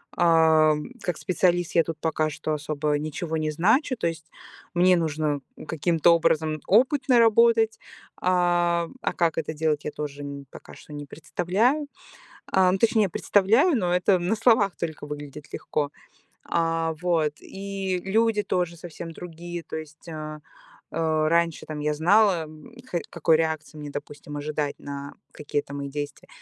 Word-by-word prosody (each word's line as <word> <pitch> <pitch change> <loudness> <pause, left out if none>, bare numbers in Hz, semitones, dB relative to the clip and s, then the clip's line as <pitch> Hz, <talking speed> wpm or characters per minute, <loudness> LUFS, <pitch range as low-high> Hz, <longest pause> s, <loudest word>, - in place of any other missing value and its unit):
а, 160 -2 +5 0.3
как 175 -4 -2
специалист 175 -2 +1
я 165 - +6
тут 165 -1 -5
пока 155 0 0
что 155 +1 -3
особо 150 0 -1
ничего 155 +2 -3
не 155 -1 -1
значу, 230 - +2
то 190 - 0
есть 165 -1 -6 0.4
мне 180 +1 +5
нужно 155 -3 -1 0.3
каким-то 165 +1 +3
образом 155 -2 +1
опыт 260 +8 +3
наработать, 230 -1 +5 0.4
а, 175 -2 +2
а - - -1
как 165 -2 +1
это 160 0 -2
делать, 150 -1 0
я 150 - -2
тоже 145 -1 -6 0.3
пока - - -12
что 150 - -13
не 145 0 -6
представляю. 205 - 0 0.6
А, 185 -1 +4
ну 190 - +1
точнее 220 -2 +3
представляю, 225 - +3
но 180 -4 0
это 180 +1 +3
на 180 +5 0
словах 220 -4 +3
только 160 -3 -5
выглядит 145 0 -8
легко. 145 -1 -2 0.5
А 165 -1 0
вот, 165 -4 +1
и 195 -1 -4
люди 220 +2 +2
тоже 180 -3 -1
совсем 165 0 -8
другие. 175 +1 -7
То - - -6
есть, 155 +1 -10
а, 155 -1 -6 0.5
а, 155 -1 +1
раньше 170 -1 +1
там 155 -1 -5
я 150 0 0
знала, 175 +1 +3 0.4
х 175 - -1
какой 160 -1 +3
реакции 160 -1 -2
мне, 150 -1 -7
допустим, 145 0 -8
ожидать 150 0 -3
на 140 0 -7 0.2
какие-то 145 -1 -4
мои 140 0 -4
действия. 145 +1 -6
165 Hz, 150 wpm, -25 LUFS, 155-185 Hz, 0.6 s, я